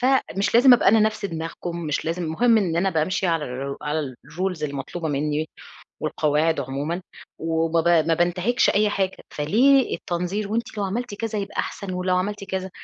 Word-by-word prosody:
فمش 245 -6 +1
لازم 250 +2 +8
أبقى 245 - +3
أنا 220 +2 +5
نفس 215 -1 +1
دماغكم، 165 0 -5
مش 150 - -1
لازم 170 +2 -2
مهم 225 +8 +3
إن 175 -6 0
أنا 190 +3 +2
بامشي 185 +4 0
على 165 -3 +1
ال 135 +2 -5
على 150 -3 -2
الrules 180 +3 -3
المطلوبة 145 +3 -4
مني 150 +2 -1 0.5
والقواعد 155 +1 +1
عمومًا، 140 +6 -3 0.4
وما 165 0 +1
ب 165 - 0 0.2
ما 165 - +3
بانتهكش 180 +8 +2
أي 210 +1 +2
حاجة. 190 -2 -1
فليه 250 - +3
التنظير؟ 180 +4 -3
وأنتِ 225 -1 -3
لو 200 - 0
عملتِ 225 +3 -3
كذا 220 0 -3
هيبقى 200 - -5
أحسن، 195 -2 -3
ولو 180 0 0
عملتِ 200 +2 -2
كذا 190 -1 -4
180 Hz, 175 wpm, -23 LUFS, 160-205 Hz, 0.5 s, لازم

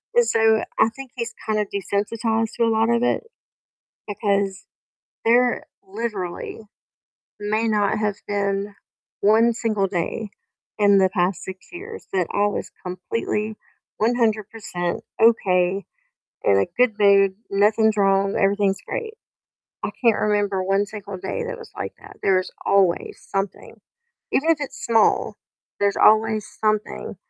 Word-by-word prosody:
and 480 0 +5
so 225 - +3 0.2
I 225 - +5
think 265 +2 -10
he's 235 -1 -4
kind 215 -1 0
of 210 - 0
desensitized 220 +3 -1
to 235 - +2
a - - +3
lot 225 +1 +2
of 235 0 +2
it, 245 - +1 0.8
because 200 -2 -1 0.6
there 245 +2 +3 0.2
literally 200 -3 -4 0.8
may 215 +2 0
not 210 -1 +1
have 210 -2 -1
been 200 0 -1 0.5
1 225 +3 +4
single 215 -4 0
day 195 +3 -3 0.5
in 200 -1 +5
the 190 - +4
past 180 -1 -1
6 190 0 -9
years 440 +6 -9
that 185 -3 +1
I 205 0 +2
was 205 - -3
completely 210 +3 -3 0.4
100% 215 -6 -1 0.2
okay, 190 -4 +3 0.6
in 100 - +4
a 100 - +3
good 250 -2 +4
mood, 200 -1 +5
nothing's 215 +2 +3
wrong, 195 0 +2
everything's 200 -1 +2
great. 450 -2 -4 0.7
I - - -1
can't 230 -3 +4
remember 205 -2 +1
1 195 +2 +1
single 205 -2 -8
day 190 +1 -4
that - - -5
was 455 -2 -12
like - - -4
that, - - -14
there 190 -1 +4
is 185 - -6
always 190 -3 +1
something, 195 0 -3 0.6
even 315 +5 +1
if 330 - +4
it's 285 - -6
small, 225 -3 +3 0.4
there's 200 0 +2
always 220 0 +4
something 215 -1 -1
210 Hz, 140 wpm, -23 LUFS, 195-225 Hz, 0.8 s, and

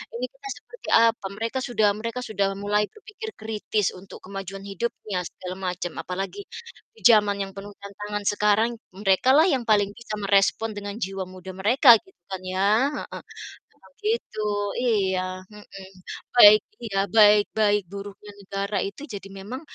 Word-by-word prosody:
Ini 245 +2 -2
kita 270 +9 -12
seperti 485 - -11
apa? 230 -2 +4
Mereka 230 +4 -2
sudah 225 -5 +2
mereka 230 +3 -4
sudah 200 -4 0
mulai 205 +1 +1
berpikir 430 +1 -9
kritis 215 -1 -1
untuk 185 +1 -12
kemajuan 195 0 -7
hidupnya, 200 -1 -4
segala 180 +1 -7 0.2
macam, 175 -1 -5
apalagi 195 - -5 0.6
di - - -18
zaman 210 -3 +6
yang 195 0 -4
penuh 205 +1 -8
tantangan 205 +1 -6
sekarang, 210 +2 +3 0.2
mereka 195 +4 +2
lah 315 - +6
yang 265 -6 +1
paling 205 -2 +3
bisa 235 -2 -8
merespon 200 +2 +2
dengan 205 0 -5
jiwa 195 -3 -3
muda 185 0 -10
mereka 235 +5 +6
gitu 190 - -23
kan 190 -1 -4
ya. 185 +2 0 0.3
Heeh, - - -6 0.5
emang - - -22
gitu. 425 - -2 0.3
Iya. 200 -7 +1 0.3
Mhm. 200 -2 -12 0.4
Baik 215 -3 +9 0.2
iya. 205 -4 -3 0.2
Baik 210 -1 +7
baik 210 -1 +3
buruknya 200 +1 -9
negara 200 +1 -3
itu 200 +8 -11
jadi 195 -1 -7
memang, 220 +7 -7
205 Hz, 150 wpm, -25 LUFS, 195-225 Hz, 0.6 s, Baik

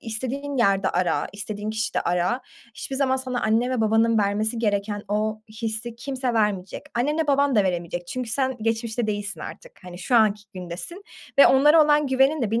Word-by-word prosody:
istediğin 260 +5 -4
yerde 195 -4 +2
ara, 180 0 0
istediğin 205 +1 -5
kişide 220 +1 -1
ara, 180 +9 0 0.3
hiçbir 270 - -5
zaman 265 -1 +2
sana 255 -2 -3
anne 225 +3 +2
ve 250 -3 0
babanın 225 +1 +3
vermesi 210 +3 0
gereken 205 -1 -1
o 215 +1 -1 0.2
hissi 225 +1 -3
kimse 260 0 -3
vermeyecek. 205 -4 -1
Annenle 295 +6 0
baban 280 -1 +2
da 205 - +4
veremeyecek 175 -1 -3
çünkü 250 +4 -4
sen 260 +1 0
geçmişte 225 0 -1
değilsin 205 -5 -3
artık, 180 - -10
hani, 180 0 -9
şu 240 +7 +1
anki 210 -2 +3
gündesin 185 - -7 0.3
ve - - +9
onlara 300 +4 +6
olan 295 -1 +3
güvenin 270 +2 +2
de 210 - -1
bir 230 +2 +1
225 Hz, 175 wpm, -24 LUFS, 205-260 Hz, 0.3 s, ve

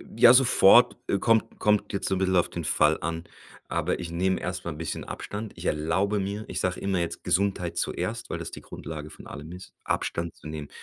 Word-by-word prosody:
Ja, 120 +1 +8
sofort, 120 -2 +6
äh, 100 - +1
kommt 115 +1 +2
kommt 105 -1 +2
jetzt 100 - -1
so 95 - +1
'n - - -1
bissel 95 -1 +1
auf 85 - +2
den 85 - -5
Fall 75 0 +3
an, 80 +1 -3 0.4
aber - - -1
ich 85 - -5
nehme 95 +2 +1
erst 90 0 -4
mal 85 - -3
'n 75 - -8
bisschen 80 0 -4
Abstand. 105 +1 -6
Ich - - -8
erlaube 95 +7 +1
mir 100 +2 -3
ich - - -3
sage 90 0 -1
immer 95 -2 0
jetzt: 85 -1 -3
„Gesundheit 95 -2 0
zuerst“, - - -2
weil - - -3
das - - -6
die - - -8
Grundlage 75 -1 -8
von - - -12
allem 75 +3 -8
ist, 90 +1 -11
Abstand 85 0 -2
zu - - -12
nehmen, 75 -2 -6
90 Hz, 220 wpm, -27 LUFS, 80-100 Hz, 0.4 s, Ja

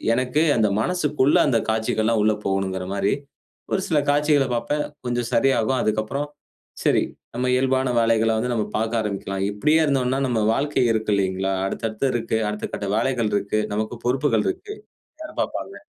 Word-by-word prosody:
எனக்கு 130 +4 +1 0.2
அந்த 110 -2 +3
மனசுக்குள்ள 150 -4 +2
அந்த 115 -5 +3
காட்சிகள்லாம் 110 0 +1
உள்ள 110 0 +3
போகணுங்குற 95 -1 -1
மாரி, 100 +1 +1 0.6
ஒரு 195 - +1
சில 160 - +1
காட்சிகளப் 145 -3 +2
பாப்பேன். 145 +6 -1 0.2
கொஞ்சம் 120 -1 -1
சரியாகும். 130 0 +2
அதுக்கப்புறம் 110 +7 -1 0.5
சரி - - +3 0.3
நம்ம 125 +1 -1
இயல்பான 130 0 +2
வேலைகள 115 -1 +3
வந்து 125 +2 -1
நம்ம 110 -3 0
பாக்க 110 +2 -1
ஆரம்பிக்கலாம். 100 -2 -3
இப்டியே 150 +11 +2
இருந்தோம்னா, 135 -2 +1
நம்ம 120 -3 0
வாழ்க்கை 145 0 +1
இருக்கில்லிங்களா? 95 -3 0
அடுத்தடுத்து 110 +5 -2
இருக்கு. 115 -1 -1
அடுத்த 105 0 -4
கட்ட 100 - -3
வேலைகள் 115 -3 0
இருக்கு. 105 +1 0
நமக்கு 110 +3 -2
பொறுப்புகள் 135 +4 +1
இருக்கு. 380 +3 -4 0.5
யார் 310 - -9
பாப்பாங்க? - - -5
115 Hz, 145 wpm, -23 LUFS, 110-135 Hz, 0.6 s, அந்த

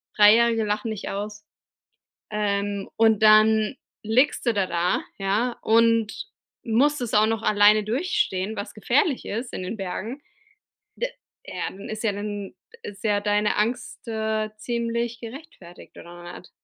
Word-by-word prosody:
3- 210 0 +8
jährige 230 -1 +3
lachen 210 +1 -2
dich 210 -2 -5
aus, 210 +1 -6 0.9
ähm, 200 -1 -2
und 220 -2 +3
dann 215 +2 +5 0.3
liegst 245 +7 +2
du 235 - +4
da 195 -2 +1
da, 175 0 0 0.2
ja, 210 +5 0
und 230 -1 +2 0.4
musst 275 +6 +2
es 240 -3 -3
auch 210 0 +5
noch 225 0 -1
alleine 210 0 +5
durchstehen, 220 - -1
was 205 0 -6
gefährlich 255 +6 +1
ist 235 +4 -4
in - - -4
den 185 +5 -4
Bergen. 205 +8 -5 0.8
D - - -1 0.4
Ja, - - -4
dann 195 - -10
ist 215 0 -5
ja 220 - +3
dann 205 -1 -5 0.3
ist 200 +1 -10
ja 205 -2 +2
deine 210 0 +1
Angst, 235 +3 -2
äh, 220 -1 -1
ziemlich 235 0 -2
gerechtfertigt 230 - -12
oder 175 0 -10
nicht? 180 - -19
215 Hz, 150 wpm, -24 LUFS, 205-230 Hz, 0.9 s, 3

